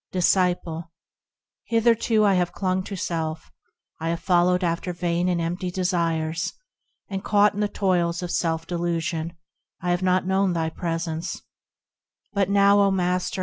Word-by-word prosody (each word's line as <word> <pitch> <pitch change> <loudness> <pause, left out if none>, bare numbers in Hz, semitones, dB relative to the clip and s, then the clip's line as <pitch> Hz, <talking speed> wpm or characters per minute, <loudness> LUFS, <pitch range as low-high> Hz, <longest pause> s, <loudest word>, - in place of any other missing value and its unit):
Disciple. 175 -2 +1 0.7
Hitherto 230 -1 +3
I 200 - +4
have 180 -1 +1
clung 185 -1 0
to 200 - -5
self; 160 -3 -3 0.5
I 165 +1 -2
have 170 0 -1
followed 180 +1 +2
after 175 +1 -1
vain 175 0 0
and 175 -1 +1
empty 175 +2 -2
desires; 165 -3 -1 0.5
And 195 -2 -4
caught 205 0 +4
in 205 - -5
the 210 - +2
toils 180 -4 0
of 175 - -4
self 165 -1 0
delusion, 170 -1 -2 0.4
I 180 - -1
have 175 +1 0
not 185 0 +2
known 190 0 +2
thy 160 -1 -1
presence; 165 -1 -3 0.9
But 200 -2 +1
now, 200 0 +5
O 200 -1 +5
Master! 180 -1 0
180 Hz, 145 wpm, -24 LUFS, 170-190 Hz, 0.9 s, now